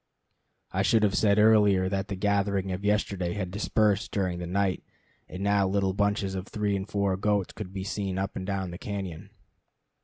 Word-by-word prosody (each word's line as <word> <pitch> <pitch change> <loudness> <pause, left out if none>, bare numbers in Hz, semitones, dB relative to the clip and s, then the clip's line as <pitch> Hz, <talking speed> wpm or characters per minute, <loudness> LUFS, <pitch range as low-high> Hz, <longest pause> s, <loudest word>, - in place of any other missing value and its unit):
I 95 - 0
should 110 +3 +3
have 100 -2 +3
said 100 -1 +3
earlier 105 -3 +5
that 95 +1 -2
the 100 - -4
gathering 100 -1 0
of 90 +2 -4
yesterday 100 -4 0
had 95 -3 -3
dispersed 105 0 +1
during 90 -3 -1
the 90 - -5
night, 95 0 0 0.5
and 95 +2 -6
now 100 -1 +3
little 95 0 +1
bunches 100 -1 0
of 95 +1 -5
three 105 -2 -1
and 95 +1 -4
four 100 -2 +1
goats 100 -1 0
could 105 -4 -7
be 95 -1 -5
seen 95 -1 -3
up 95 0 -3
and 95 - -4
down 95 -3 -2
the 85 - -8
cañon. 95 -2 -5
100 Hz, 190 wpm, -27 LUFS, 95-100 Hz, 0.5 s, earlier